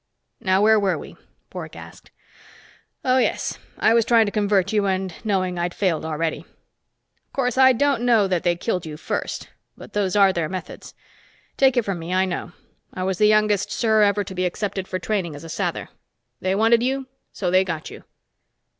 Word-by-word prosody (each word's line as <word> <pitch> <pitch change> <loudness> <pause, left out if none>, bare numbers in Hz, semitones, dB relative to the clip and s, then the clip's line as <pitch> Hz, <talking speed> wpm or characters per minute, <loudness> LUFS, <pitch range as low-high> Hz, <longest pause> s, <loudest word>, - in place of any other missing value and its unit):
"Now 190 -2 +2
where 220 0 +5
were 195 -2 +1
we?" - - -10 0.4
Bork - - -7
asked. - - -12 1.0
"Oh, 255 0 +4
yes, - - -1 0.2
I 220 - +3
was 230 0 +4
trying 230 0 +4
to 205 - -3
convert 200 -2 +1
you 205 -2 +2
and 190 -1 -1
knowing 185 -4 -1
I'd 175 0 -2
failed 180 -6 0
already. 160 0 -2
Of - - -27
course, 250 -3 0
I 260 0 +7
don't 275 0 +1
know 230 -5 +3
that 180 -3 0
they 175 -1 +1
killed 180 0 -2
you 155 -2 -7
first - - -4 0.3
but - - -12
those 205 -2 0
are 195 -2 +5
their 165 -3 -2
methods. 185 -2 -8 0.6
Take 265 -2 +3
it 240 - +2
from 195 -3 -2
me, 170 +3 -3
I 190 0 +3
know. 175 -1 -4 0.4
I 185 - -5
was 190 -1 -2
the 210 - +5
youngest 215 -2 +2
Ser 220 -2 +2
ever 205 0 +3
to 190 - -8
be 185 0 -1
accepted 195 +1 -4
for 185 - -3
training 185 -4 -2
as 145 - -10
a 165 - -9
Sather. - - -3 0.5
They 185 +1 0
wanted 225 +3 +4
you, 265 +2 -1 0.3
so 180 -3 -2
they 185 +1 +5
got 165 -4 -5
you." - - -11
195 Hz, 195 wpm, -22 LUFS, 180-220 Hz, 1.0 s, I